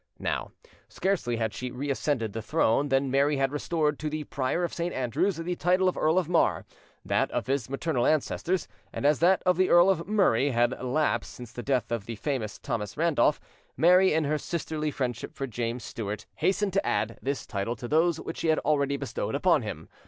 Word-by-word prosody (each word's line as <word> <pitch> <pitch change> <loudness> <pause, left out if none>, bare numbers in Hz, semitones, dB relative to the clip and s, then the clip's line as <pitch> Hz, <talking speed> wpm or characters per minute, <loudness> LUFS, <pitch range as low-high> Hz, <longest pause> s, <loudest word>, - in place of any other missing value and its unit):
Now, - - -2 0.4
scarcely 180 -12 -1
had 110 -2 -2
she 125 - -4
reascended 130 -3 -2
the 115 - -4
throne 140 +1 +1
than 135 0 +1
Mary 140 +2 +2
had 135 0 +1
restored 150 0 -1
to 155 - -2
the 155 0 -3
Prior 140 +5 -1
of 175 - -2
St. 170 +1 -2
Andrews 130 - 0
the 170 +2 -3
title 185 +2 +2
of 185 - +1
Earl 160 +3 +2
of 185 -4 +2
Mar, 170 -1 +2 0.4
that - - +1
of - - -2
his 130 -3 -1
maternal 135 -2 0
ancestors, 170 +4 0 0.2
and - - -4
as 145 0 +4
that 185 +3 +4
of 180 -1 +3
the 185 0 +3
Earl 175 +2 +6
of 170 -3 -2
Murray 190 - +3
had 120 -1 +2
lapsed 130 -2 0
since 120 -3 -10
the 120 - -6
death 130 -2 -1
of 115 -3 -3
the 115 - -4
famous 110 -2 -3
Thomas 105 0 -4
Randolph, 155 -2 +2 0.4
Mary, 180 +3 +5
in 160 +1 +2
her 150 +1 0
sisterly 155 -2 -3
friendship 125 -5 -4
for 135 - -3
James 120 -1 -3
Stuart, 105 -1 -5
hastened 190 +4 +1
to 195 - +2
add, 115 +1 -1
this 140 +1 -3
title 100 +2 -3
to 120 +2 -7
those 160 +3 +2
which 165 - -6
she - - -2
had 160 -1 +3
already 140 -2 +1
bestowed 140 -5 -3
upon - - +3
him. - - -6
145 Hz, 205 wpm, -27 LUFS, 125-165 Hz, 0.4 s, Earl